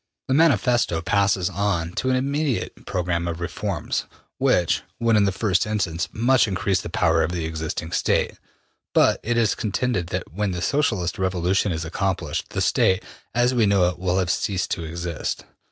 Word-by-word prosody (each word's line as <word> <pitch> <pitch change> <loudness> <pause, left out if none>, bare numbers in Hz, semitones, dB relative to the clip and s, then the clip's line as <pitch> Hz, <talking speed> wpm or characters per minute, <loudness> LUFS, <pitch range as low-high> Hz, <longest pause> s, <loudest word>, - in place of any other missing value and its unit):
'' - - -62
The - - +3
Manifesto 125 - +3
passes 100 -1 +2
on 90 -5 -1
to 130 +8 -2
an 130 - +3
immediate 140 0 -2
program 85 -1 -1
of 85 -1 -3
reforms, 90 -1 -3 0.3
which 85 -2 +2 0.2
would 115 -1 +3
in 105 -1 +4
the 100 - +2
first 100 +1 +1
instance 95 -5 -1
much 125 +2 +3
increase 95 -1 0
the - - -6
power 80 0 +2
of 80 +1 0
the 85 -2 -2
existing 80 0 -4
State, - - 0 0.6
but - - +4
it 120 +1 -1
is 115 -3 +3
contended 110 -3 -1
that 90 -2 -5
when 100 0 -1
the 90 - -4
Socialist 110 - 0
revolution 95 +1 +1
is 80 -1 -3
accomplished, 95 +3 -2
the - - -2
State, 95 +2 +2 0.3
as 120 +1 +3
we 115 -4 +3
know 95 -3 +4
it, 90 -1 -7
will 90 0 0
have 90 -3 +1
ceased 95 -3 -1
to 85 - -2
exist. 85 0 -4
95 Hz, 180 wpm, -23 LUFS, 85-110 Hz, 0.6 s, in